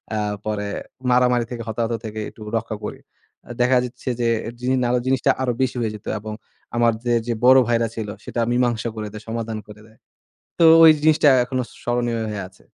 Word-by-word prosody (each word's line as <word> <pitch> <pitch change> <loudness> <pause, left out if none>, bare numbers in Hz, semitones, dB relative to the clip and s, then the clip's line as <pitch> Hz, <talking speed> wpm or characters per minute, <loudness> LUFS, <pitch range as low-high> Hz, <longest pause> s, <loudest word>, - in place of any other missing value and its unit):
আ - - 0 0.3
পরে 105 -1 -2 0.4
মারামারি 125 -1 +3
থেকে 120 -1 -5
হতাহত 115 +1 -1
থেকে 110 0 -5
একটু - - -18 0.2
রক্ষা 110 -1 -4
করি। - - -6 0.5
আ - - -9
দেখা 125 +1 +4
যাচ্ছে 125 +2 -7
যে, 120 - +2 0.3
জিনি 130 +1 +1
নারে 125 +1 +2
জিনিসটা 130 -2 +3
আরো 130 -1 +1
বেশি 130 - 0
হয়ে 110 -2 -1
যেত 105 - -13
এবং 110 +1 -7 0.4
আমার 120 -1 +3
যে, 120 - +2
যে, 120 - 0
বড় 130 +1 +8
ভাইরা 115 -1 +2
ছিল 110 -2 -4 0.2
সেটা 120 - -2
মীমাংসা 120 -2 +1
করে 110 -1 -4
দেয়, 110 0 -9
সমাধান 115 -1 -3
করে 105 0 -13
দেয়। 110 - -22 0.6
তো 170 - +5 0.2
ওই 160 - +10
জিনিসটা 155 -1 +4 0.2
এখনো 130 0 -2 0.2
স্মরণীয় 120 -1 -1
হয়ে 105 -2 -4
আছে। 95 - -24
120 Hz, 195 wpm, -22 LUFS, 110-125 Hz, 0.6 s, ওই